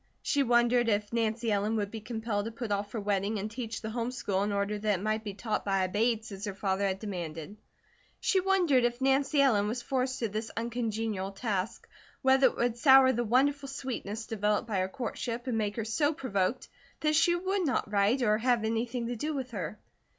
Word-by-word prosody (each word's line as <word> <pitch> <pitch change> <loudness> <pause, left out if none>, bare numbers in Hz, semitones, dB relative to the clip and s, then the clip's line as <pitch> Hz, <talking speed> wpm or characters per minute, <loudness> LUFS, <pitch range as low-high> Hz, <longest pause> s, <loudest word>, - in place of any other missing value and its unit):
She 285 - +2
wondered 240 -1 +3
if 205 +1 0
Nancy 225 0 0
Ellen 210 +2 +1
would 205 -2 -1
be 225 - -6
compelled 220 -2 -3
to 225 - -4
put 230 -1 -5
off 205 0 -1
her 230 - -2
wedding 205 +1 0
and 205 +2 -4
teach 230 -1 -5
the 220 - -4
home 235 +1 -2
school 200 -6 -2
in 205 +1 0
order 200 +1 -1
that 210 -2 +1
it - - -7
might 215 +1 0
be 205 -3 -6
taught 215 0 -2
by 195 -1 +1
a - - +1
Bates, 220 +3 0
as 195 0 -8
her 200 -2 -4
father 195 0 0
had 190 0 -1
demanded. 175 -3 -6 0.6
She 385 - +2
wondered 360 -9 +3
if 240 0 0
Nancy 270 +2 +2
Ellen 210 -7 +3
was 240 +3 -3
forced 260 0 -1
to 230 - -1
this 215 +2 -4
uncongenial 225 -4 -2
task, 200 -1 -3 0.4
whether 265 0 +6
it - - -3
would 240 -1 0
sour 265 -1 +7
the 240 - 0
wonderful 275 +4 +2
sweetness 230 -5 -5
developed 210 0 0
by 205 -4 -1
her 185 0 0
courtship, 240 +1 -4
and 250 -3 -1
make 210 -2 -1
her 225 - -3
so 290 +7 +1
provoked 230 - -1 0.3
that 305 0 +2
she 340 +3 +4
would 375 0 -1
not 250 -5 -1
write 210 +6 +2
or 215 -2 +3
have 240 -1 +2
anything 230 +2 -1
to 240 +1 -3
do 300 +6 -3
with 260 -2 -4
her. 200 -2 -4
225 Hz, 215 wpm, -30 LUFS, 205-250 Hz, 0.6 s, sour